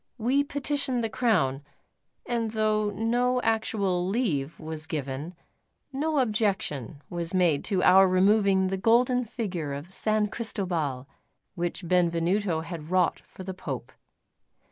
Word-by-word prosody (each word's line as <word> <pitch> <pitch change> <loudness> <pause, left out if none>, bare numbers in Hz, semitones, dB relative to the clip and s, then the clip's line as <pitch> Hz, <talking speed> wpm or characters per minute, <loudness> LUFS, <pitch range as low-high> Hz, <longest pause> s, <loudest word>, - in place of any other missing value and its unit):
We 260 +5 +2
petitioned 280 -3 -1
the 225 - -2
Crown; 190 - +1 0.6
and 235 -2 -1
though 215 -1 +1
no 240 +4 +1
actual 200 -5 0
leave 165 - -1
was 160 0 -5
given, 145 +3 -4 0.6
no 305 +3 -1
objection 195 - -1
was 170 +1 -4
made 170 -6 +3
to 190 -3 0
our 190 +1 +7
removing 190 0 +3
the 190 - -1
golden 245 +5 +3
figure 180 - -4
of 145 +7 -7
San 215 0 +1
Cristobal 175 - -3 0.5
which 175 0 -3
Benvenuto 175 +1 +1
had 165 -2 -7
wrought 180 -1 +2
for 190 - -12
the 190 0 -5
Pope. 185 - -6
190 Hz, 125 wpm, -27 LUFS, 170-225 Hz, 0.6 s, our